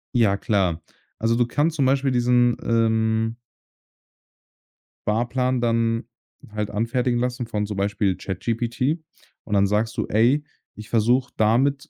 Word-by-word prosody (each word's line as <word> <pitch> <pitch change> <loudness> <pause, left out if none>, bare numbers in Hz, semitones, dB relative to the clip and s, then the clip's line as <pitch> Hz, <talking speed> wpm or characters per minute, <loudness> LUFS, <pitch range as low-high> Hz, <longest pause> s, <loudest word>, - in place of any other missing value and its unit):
Ja, 105 -5 +3
klar. 95 -7 0 0.4
Also, 115 +1 +1
du 120 0 +2
kannst 150 +6 0
zum 140 - +1
Beispiel 135 +1 +2
diesen, 120 -1 +3
ähm 110 0 +1 1.7
Sparplan 125 +4 0
dann 115 -1 0 0.5
halt 105 -1 -3
anfertigen 120 +3 0
lassen 125 0 -2
von 105 -2 -2
zum 105 -1 -5
Beispiel 100 -1 0
ChatGPT. 120 - -2 0.4
Und 105 - -6
dann 100 -1 +4
sagst 105 +2 -1
du: - - 0
„Ey, 120 +8 +3 0.3
ich 105 0 -11
versuche 120 +3 +2
damit, 130 +6 +2
115 Hz, 130 wpm, -23 LUFS, 105-125 Hz, 1.7 s, dann